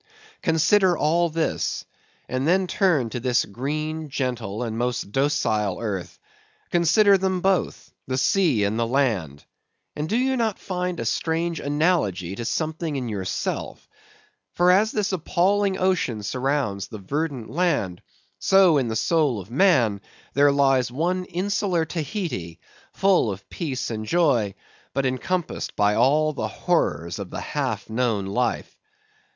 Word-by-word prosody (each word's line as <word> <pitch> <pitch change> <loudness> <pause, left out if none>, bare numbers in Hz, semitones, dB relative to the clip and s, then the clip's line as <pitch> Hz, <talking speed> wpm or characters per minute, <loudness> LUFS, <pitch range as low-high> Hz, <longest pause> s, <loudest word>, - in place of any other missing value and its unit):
Consider 175 +3 +3
all 170 +3 +2
this; 160 0 -2 0.4
and 130 +3 -1
then 185 +2 +3
turn 170 - +1
to 125 - -3
this 120 0 +1
green, 155 +7 -4
gentle, 125 -5 -3
and 115 -2 -3
most 120 -3 -2
docile 110 -8 0
earth; 100 -6 -4 0.5
consider 195 +4 +4
them 190 -1 0
both, 190 0 0
the 130 0 -1
sea 150 - +2
and 105 +3 0
the 115 - +1
land; 110 - -1 0.5
and 150 +1 -3
do 220 - +1
you 260 +1 +1
not 225 -5 0
find 180 -2 -3
a - - -3
strange 165 +1 -1
analogy 145 - 0
to 115 - -5
something 160 +2 -2
in 125 -3 -3
yourself? 95 -3 -4 0.7
For 180 +1 +5
as 210 +4 +4
this 205 -2 -1
appalling 190 +3 +1
ocean 175 - 0
surrounds 125 -4 -1
the 110 - -8
verdant 135 +4 -3
land, 145 - 0 0.4
so 190 -6 +5
in 130 - -1
the 110 - -3
soul 145 -2 +1
of 95 +3 -11
man 125 - +3 0.3
there 145 +1 +5
lies 135 -3 +2
one 180 +7 -1
insular 185 -1 -1
Tahiti, 155 - -4 0.3
full 195 - +3
of 100 +1 -9
peace 135 -8 -3
and 110 -1 -4
joy, 120 - +2 0.4
but 135 0 +1
encompassed 160 +7 -2
by 105 0 +3
all 150 +7 +3
the - - -3
horrors 85 - -1
of - - -6
the - - -5
half - - -3
known 110 -3 0
life. 120 +5 -2
145 Hz, 145 wpm, -24 LUFS, 115-175 Hz, 0.7 s, For